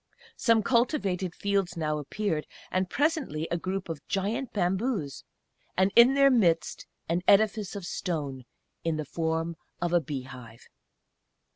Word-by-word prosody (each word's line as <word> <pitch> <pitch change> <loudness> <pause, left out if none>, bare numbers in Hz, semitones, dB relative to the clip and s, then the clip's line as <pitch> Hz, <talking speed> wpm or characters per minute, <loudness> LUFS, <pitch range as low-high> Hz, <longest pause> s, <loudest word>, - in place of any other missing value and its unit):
Some 230 -2 +3
cultivated 200 - +1
fields 195 -3 -1
now 155 -2 -1
appeared, 160 +1 -2 0.2
and 185 0 0
presently 285 - 0
a - - +2
group 185 +2 -3
of 160 -3 -6
giant 220 +7 -1
bamboos, 190 - -1 0.5
and 190 +2 +3
in 240 +3 +8
their 275 0 +6
midst 170 -10 +1 0.2
an 170 +2 0
edifice 210 0 +3
of 200 -3 -5
stone, 145 -9 -3 0.4
in 165 -2 0
the 155 - -3
form 165 +2 -2 0.2
of 175 0 -1
a 175 - +4
bee 140 -3 -5
hive. 125 -3 -12
180 Hz, 140 wpm, -28 LUFS, 160-210 Hz, 0.5 s, in